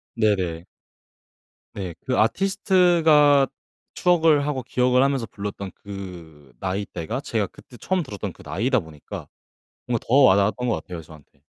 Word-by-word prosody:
네네. 95 -7 0 1.1
네. 95 -4 -5
그 130 -1 -1
아티스트가 160 - +4 0.5
추억을 160 -5 +3
하고 135 -4 -2
기억을 125 +1 +2
하면서 135 -3 +1
불렀던 100 -2 -6
그 85 -8 -10
나이대가 95 +2 -3
제가 110 -7 -1
그때 120 - -16
처음 185 +7 -1
들었던 105 - -6
그 - - -16
나이다 125 +5 0
보니까 80 -5 -9 0.6
뭔가 120 -2 -2
더 120 - +1
와닿았던 115 -1 +4
것 115 - +2
같아요 90 -3 -6
저한테. 75 -3 -17
115 Hz, 300 characters per minute, -23 LUFS, 95-140 Hz, 1.1 s, 아티스트가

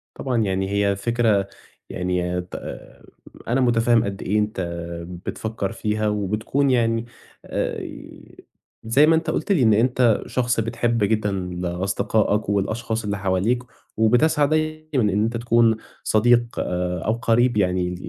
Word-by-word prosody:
طبعًا 130 -3 -2
يعني 95 -3 0
هي 100 0 +1
فكرة 110 -2 +1 0.4
يعني 90 0 -1
ت 90 - -11 0.9
أنا 125 +3 +1
متفهّم 120 -1 +3
قد 100 -2 -4
إيه 105 +3 0
أنت 105 -2 -2 0.6
بتفكّر 110 -3 -3
فيها، 105 0 -1
وبتكُون 105 +7 0
يعني 115 -2 +1 0.4
آآ، - - -2 1.0
زي 120 +7 +4
ما 165 - +5
أنت 160 0 -1
قُلت 160 +4 -1
لي 165 -10 +3
إن 110 -2 +5
أنت 120 0 +3
شخص 125 -2 0
بتحِب 115 0 0
جدًا 105 0 +1
ل 90 -2 -4
أصدقاءك 100 +4 0
والأشخاص 110 +3 -1
اللي 100 -1 -2
حواليك، 100 +6 0 0.3
وبتسعى 140 +7 +3
دايمًا 155 -7 0
إن 105 +2 +2
أنت 115 +1 -1
تكُون 115 -1 +3 0.3
صديق 120 +2 +2
آآ 90 0 -2
أو 110 - +2
قرِيب 120 0 +2
يعني 90 -2 0
110 Hz, 135 wpm, -22 LUFS, 100-120 Hz, 1.0 s, ما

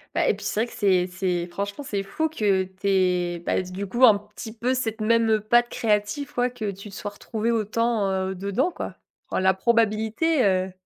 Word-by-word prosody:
Bah - - +2
et - - +4
puis - - -9
c'est 215 - -1
vrai 235 - 0
que - - -13
c'est 185 -3 +2
c'est 180 -1 -2
franchement 200 +8 -5
c'est 200 -2 -1
fou 255 +12 -2
que 205 -10 +1
tu 190 +1 -7
aies 180 -3 +1
bah, - - +1
dé 180 - -9
du 190 +2 -4
coup 240 +6 -1
un 215 -4 +7
petit 210 +2 -10
peu 245 +3 0
cette 225 -3 -2
même, 230 +1 +3
heu, 220 -1 +3
patte 240 +3 +3
créative 210 +5 -1
quoi, 245 0 +1
que 225 -5 -4
tu 200 +2 -10
te 195 - -11
sois 205 - -5
retrouvée 220 +2 -3
autant, 225 -1 0
heu, 190 0 -1
dedans 200 - -1
quoi. - - -6 0.3
Roa - - -1
la 190 0 +4
probabilité, 225 - +1
heu 185 -1 +1
210 Hz, 220 wpm, -24 LUFS, 190-230 Hz, 0.3 s, un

